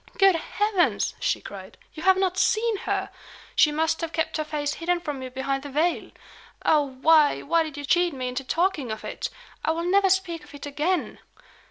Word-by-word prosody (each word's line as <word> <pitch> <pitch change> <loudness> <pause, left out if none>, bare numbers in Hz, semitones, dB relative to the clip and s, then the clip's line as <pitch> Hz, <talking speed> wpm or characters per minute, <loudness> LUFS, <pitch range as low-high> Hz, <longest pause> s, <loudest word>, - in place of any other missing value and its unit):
"Good 390 -1 +6
heavens!" 400 +2 0
she - - 0
cried, - - -10 0.2
"you 315 - -8
have 380 +2 +5
not 380 -1 +1
seen 440 +3 +2
her! - - -1 0.4
She 300 - +5
must 320 +2 0
have 330 -1 -3
kept 320 -1 -1
her 310 - -1
face 295 -1 -2
hidden 345 +2 -1
from 295 -6 -5
you 260 - -5
behind 270 +1 -2
the 285 - -8
veil! 315 +5 0 0.6
Oh, 305 - +5 0.2
why, 310 -2 +5
why 330 +2 +2
did 310 -3 -4
you 290 - -5
cheat 350 +4 +3
me 260 -3 -4
into 250 +2 -3
talking 320 -3 0
of 220 - -6
it! - - -4 0.3
I - - 0
will 330 +1 -1
never 390 +1 +4
speak 360 -4 0
of 295 - -14
it 285 - -8
again. 305 +6 -1
320 Hz, 200 wpm, -25 LUFS, 290-355 Hz, 0.6 s, Good